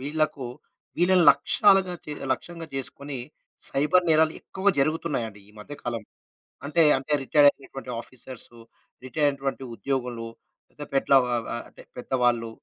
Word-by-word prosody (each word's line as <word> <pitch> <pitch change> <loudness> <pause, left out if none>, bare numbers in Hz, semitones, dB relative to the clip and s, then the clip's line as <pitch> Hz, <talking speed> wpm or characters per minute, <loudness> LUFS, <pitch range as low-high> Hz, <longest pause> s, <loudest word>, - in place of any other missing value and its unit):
వీళ్ళకు, 150 -1 -1 0.5
వీళ్ళని 180 0 +4
లక్ష్యాలుగా 195 -3 +3
చే 150 - -5 0.2
లక్ష్యంగా 170 -2 -6
చేసుకొని, 135 0 -5 0.5
సైబర్ 175 +6 +2
నేరాలు 160 0 +4
ఎక్కువగా 195 +1 0
జరుగుతున్నాయండి, 135 -9 -1
ఈ - - -23
మధ్య 145 +8 -9
కాలం. 115 -2 -3 0.7
అంటే, 165 +2 +4
అంటే, 135 +2 -6
రిటైర్ 145 +2 +5
అయినటువంటి 135 -2 -10
ఆఫీసర్సు, 120 -1 -10 0.5
రిటైర్ 145 +3 +1
అయినటువంటి 135 -1 -4
ఉద్యోగులు 125 -3 -3 0.4
పెద్ద 150 - -10
పేట్ల 135 0 +2
వ - - -4 0.2
వ - - -5 0.2
అంటే, - - -15 0.2
పెద్దవాళ్ళు 120 -2 0
140 Hz, 130 wpm, -26 LUFS, 125-160 Hz, 0.7 s, రిటైర్